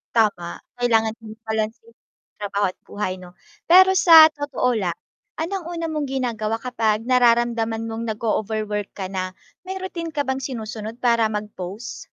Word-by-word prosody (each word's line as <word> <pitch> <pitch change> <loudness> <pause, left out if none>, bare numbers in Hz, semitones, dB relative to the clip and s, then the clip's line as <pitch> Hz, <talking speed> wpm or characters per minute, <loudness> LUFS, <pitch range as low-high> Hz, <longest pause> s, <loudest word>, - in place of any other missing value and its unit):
Tama, 205 -7 +1 0.2
kailangan 225 -2 +2
din 220 -1 -10
pala 220 -1 0
is 220 - -18 0.6
trabaho 205 -1 0
at 180 - -11
buhay 190 -2 -3
mo, 180 -1 -13 0.3
pero 375 +2 +7
sa 325 -3 +9
totoo 285 -5 -1
lang, 180 -5 -1 0.5
anong 360 +1 -3
una 335 -1 -3
mong 305 -2 -2
ginagawa 230 -5 -2
kapag 225 -4 0
nararamdaman 235 -2 +2
mong 225 +1 -4
nag-ooverwork 215 -1 -2
ka 190 -2 -5
na? 185 -1 -3 0.3
May 380 +1 -5
rutin 335 -3 -5
ka 295 - 0
bang 265 -1 -2
sinusunod 225 -2 -6
para 235 -2 +3
mag-pause? 210 0 -6
225 Hz, 150 wpm, -22 LUFS, 210-260 Hz, 0.6 s, sa